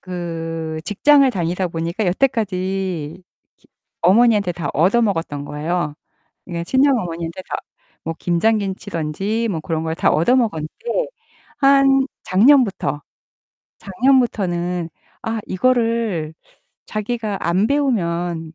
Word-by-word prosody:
그 165 -3 -5
직장을 275 +6 +4
다니다 180 -1 -1
보니까 170 +5 -2
여태까지 185 - -1 0.3
기 - - -30 0.3
어머니한테 205 -1 +4
다 165 -4 -4
얻어 185 +10 +3
먹었던 165 -8 -1
거예요. 150 +1 -2 0.5
그러니까 170 -2 -5
친정 265 +5 +3
어머니한테 170 -1 -5
다 - - -2 0.5
뭐 165 - -2
김장 210 +6 +2
김치든지 195 +3 -3
뭐 165 -5 -2
그런 160 -1 -2
걸 160 0 -2
다 - - +2
얻어 170 +12 +3
먹었는데 240 - -1 0.5
한 275 -1 +5 0.2
작년부터, 200 - +3 0.8
작년부터는 185 -7 0 0.3
아 225 -1 -2
이거를 225 -7 0 0.5
자기가 215 -1 -3
안 180 +6 +1
배우면 175 - -1
그거 - - -43
185 Hz, 265 characters per minute, -20 LUFS, 165-230 Hz, 0.8 s, 한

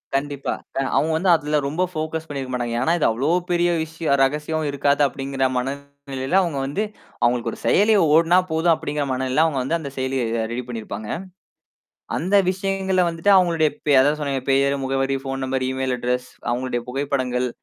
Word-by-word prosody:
கண்டிப்பா. 140 0 -2 0.2
அ - - +2 0.2
அவுங்க 160 - +2
வந்து 185 +3 +1
அதுல 150 -1 0
ரொம்ப 155 +6 0
ஃபோகஸ் 160 -1 -4
பண்ணிருக்க 135 -3 -5
மாட்டாங்க. 120 -2 -2
ஏன்னா, 160 +6 +2
"இது - - +2
அவ்வளோ 125 +6 0 0.2
பெரிய 175 0 +2
விஷய 160 -2 -1
ரகசியம் 150 +3 -1
இருக்காது," 140 +1 +1
அப்படிங்கிற 135 0 -4
மனநிலையில 140 +3 -3
அவுங்க 165 -7 -2
வந்து, 145 +10 -1 0.4
"அவுங்களுக்கு 120 -1 +1
ஒரு - - -10
செயலி 215 +2 +4 0.2
ஓடுனா 165 +3 +5
போதும்." 165 +1 +3
அப்படிங்கிற 145 -1 -3
மனநிலையில 130 +3 +1
அவுங்க 150 -5 0
வந்து 160 +6 0
அந்த 140 -4 -6
செயலிய 130 0 -1 0.2
அ - - -1
ரெடி 125 +1 -3
பண்ணியிருப்பாங்க. 110 -2 -6 1.1
அந்த 185 +4 -1 0.2
விஷயங்கள்ல 190 -1 0
வந்துட்டு 165 +5 +2
அவுங்களுடைய 165 -4 +3 0.2
பெ 145 - +4
அதான் 145 +3 +2
சொன்னனே 135 -2 -2
பெயர், 140 +1 +3
முகவரி, 135 0 0
ஃபோன் 135 0 -3
நம்பர், 130 0 -1
இமெயில் 130 -1 -1
அட்ரஸ், 125 +1 -2 0.2
அவுங்களுடைய 120 0 -2
புகைப்படங்கள், 130 -2 -1
140 Hz, 165 wpm, -22 LUFS, 130-160 Hz, 1.1 s, ஓடுனா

